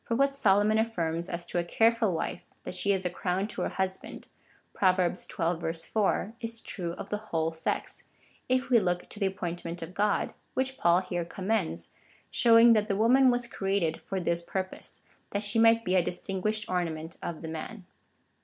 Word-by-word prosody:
For 230 Hz, -, -1 dB
what 275 Hz, +2 st, +3 dB
Solomon 210 Hz, -3 st, +3 dB
affirms 170 Hz, -6 st, -1 dB
as 170 Hz, 0 st, -4 dB
to 175 Hz, -, -2 dB
a -, -, 0 dB
careful 225 Hz, +3 st, +3 dB
wife 170 Hz, +1 st, -3 dB
— -, -, -40 dB
that -, -, -6 dB
she 200 Hz, +2 st, +1 dB
is 190 Hz, -2 st, 0 dB
a -, -, +2 dB
crown 180 Hz, +3 st, -1 dB
to -, -, -5 dB
her -, -, 0 dB
husband, 190 Hz, 0 st, -4 dB, 0.4 s
(Prov. 185 Hz, -2 st, +3 dB
xii. 170 Hz, -2 st, -1 dB, 0.2 s
4,) 215 Hz, 0 st, +1 dB
is 230 Hz, -1 st, -5 dB
true 175 Hz, -4 st, -4 dB
of 195 Hz, -, -8 dB
the 210 Hz, -, -1 dB
whole 160 Hz, -1 st, 0 dB
sex, 160 Hz, 0 st, -4 dB, 0.4 s
if 255 Hz, 0 st, +1 dB
we 240 Hz, -, +7 dB
look 180 Hz, -3 st, -1 dB
to 210 Hz, -, -8 dB
the 195 Hz, -2 st, +2 dB
api^ointment 175 Hz, -2 st, -5 dB
of 165 Hz, +2 st, -8 dB
God, 205 Hz, +1 st, +1 dB, 0.2 s
which 265 Hz, 0 st, -1 dB
Paul 175 Hz, +1 st, +4 dB
here 175 Hz, -2 st, -3 dB
commends, 185 Hz, -, -2 dB, 0.4 s
showing 230 Hz, 0 st, +7 dB
that 215 Hz, -1 st, +2 dB
the 200 Hz, -, 0 dB
woman 255 Hz, +5 st, +5 dB
was 245 Hz, -1 st, +1 dB
created 195 Hz, -7 st, -1 dB
for 195 Hz, -, -3 dB
this 170 Hz, -1 st, 0 dB
pur]30se 185 Hz, +1 st, -5 dB
— -, -, -39 dB
that 200 Hz, +1 st, -1 dB
she 205 Hz, +2 st, +1 dB
might 230 Hz, 0 st, +5 dB
be 185 Hz, -, 0 dB
a 185 Hz, -, +5 dB
distinguished 195 Hz, +5 st, -2 dB
ornament 165 Hz, -3 st, -3 dB
of 170 Hz, -1 st, -5 dB
the -, -, -4 dB
man. 170 Hz, +5 st, -6 dB
190 Hz, 190 wpm, -29 LUFS, 175-220 Hz, 0.4 s, we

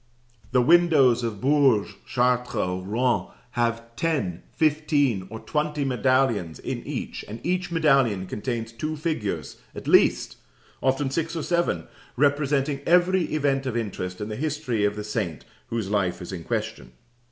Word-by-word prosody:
The 125 Hz, -, +4 dB
windows 155 Hz, -6 st, +5 dB
of 115 Hz, -4 st, -3 dB
Bourges, 135 Hz, -7 st, +3 dB
Chartres, 125 Hz, 0 st, +1 dB
or 90 Hz, -3 st, -1 dB
Rouen 120 Hz, +6 st, 0 dB, 0.2 s
have 115 Hz, -1 st, -2 dB
ten, 135 Hz, -, -1 dB
fifteen, 145 Hz, -9 st, +1 dB
or 110 Hz, +1 st, -7 dB
twenty 150 Hz, -1 st, -1 dB
medallions 130 Hz, -9 st, +1 dB
in -, -, -4 dB
each, -, -, -4 dB
and 110 Hz, +3 st, -7 dB
each 180 Hz, 0 st, 0 dB
medallion 135 Hz, -, +3 dB
contains 115 Hz, +3 st, -4 dB
two 155 Hz, +7 st, -4 dB
figures 110 Hz, -, -3 dB, 0.2 s
at -, -, -8 dB
least, -, -, +4 dB, 0.4 s
often 135 Hz, +1 st, +1 dB
six 165 Hz, +3 st, -2 dB
or 160 Hz, -, -2 dB
seven, 170 Hz, -, 0 dB, 0.3 s
representing 140 Hz, 0 st, +1 dB
every 180 Hz, +1 st, +4 dB
event 140 Hz, -3 st, 0 dB
of 120 Hz, -2 st, -1 dB
interest 90 Hz, -5 st, -4 dB
in 105 Hz, -, -4 dB
the 105 Hz, -, -4 dB
history 140 Hz, -6 st, -1 dB
of 105 Hz, 0 st, 0 dB
the 105 Hz, -, -5 dB
saint 105 Hz, -7 st, -3 dB, 0.2 s
whose 110 Hz, -4 st, -3 dB
life 95 Hz, -4 st, 0 dB
is 90 Hz, -, -7 dB
in 85 Hz, -4 st, -6 dB
question. 60 Hz, -, -4 dB
125 Hz, 150 wpm, -25 LUFS, 105-150 Hz, 0.4 s, windows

